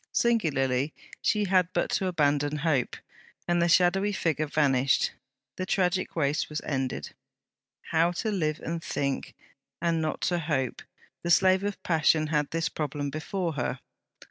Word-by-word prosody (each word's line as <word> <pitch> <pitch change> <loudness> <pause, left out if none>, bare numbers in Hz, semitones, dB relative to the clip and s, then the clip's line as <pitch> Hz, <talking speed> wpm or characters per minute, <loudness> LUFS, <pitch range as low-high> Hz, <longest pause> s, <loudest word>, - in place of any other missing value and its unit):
Singularly, 145 - +1 0.3
she 210 -1 +2
had 185 -3 +3
but - - 0
to 190 - 0
abandon 145 -3 +1
hope, 150 -5 0 0.5
and 175 0 +2
the 170 - +3
shadowy 185 +4 +4
figure 155 -5 0
vanished, 135 -3 +2 0.5
the 185 - -2
tragic 185 -1 0
race 150 -2 0
was 150 0 -3
ended. 130 -3 -3 0.8
How 165 +1 +4
to 215 +5 -2
live 155 -6 -1
and 165 0 -4
think, 140 -1 -2 0.4
and 165 -1 +1
not 155 -1 -2
to 175 -1 +1
hope: 145 -6 -1 0.4
the 170 - -3
slave 185 +2 +5
of 205 0 -4
passion 160 -1 +3
had 150 -2 0
this 165 0 -1
problem 145 -2 -3
before 170 +3 -3
her. 125 -4 -2
160 Hz, 145 wpm, -28 LUFS, 145-180 Hz, 0.8 s, slave